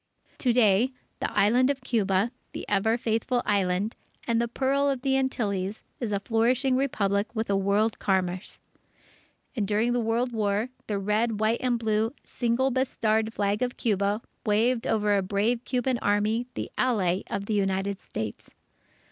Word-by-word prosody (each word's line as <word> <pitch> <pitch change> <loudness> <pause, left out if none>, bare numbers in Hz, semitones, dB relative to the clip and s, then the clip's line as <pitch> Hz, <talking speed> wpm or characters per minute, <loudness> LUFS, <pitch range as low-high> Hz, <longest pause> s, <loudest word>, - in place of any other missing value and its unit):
To 250 - +2
day, 235 +1 +4 0.3
the - - -1
Island 245 +6 +4
of 280 -2 -1
Cuba 205 -3 +1 0.2
the - - -5
"Ever 215 +3 +2
Faithful 235 +1 0
Island," 200 +1 +1 0.3
the 235 0 +2
"Pearl 275 +3 +1
of 265 -2 -2
the 270 -1 +2
Antilles," 210 -7 -1 0.2
is 235 -4 -2
a 200 - +1
flourishing 245 +5 +2
Republic 215 -5 0
with 220 -2 -1
a - - +3
world 200 +3 +1
commerce. 185 -1 -1 1.0
And 210 -5 -1
during 215 +4 +1
the 245 - +1
World 235 +2 0
War, 210 +1 0 0.2
the 210 - -1
red, 210 +2 0
white, 220 +2 +2
and 250 -2 +1
blue, 220 +2 0
single 245 +2 0
bestarred 220 -4 +1
Flag 205 0 -1
of 250 -1 -1
Cuba, 205 0 0 0.2
waved 230 +3 +2
over 210 -2 +2
a 200 - +2
brave 210 +5 0
Cuban 250 -1 0
Army, 210 +4 +1
the - - -4
ally 195 -8 +2
of 200 - -3
the 215 - -2
United 195 -1 0
States. 110 -1 -6
220 Hz, 155 wpm, -27 LUFS, 200-245 Hz, 1.0 s, day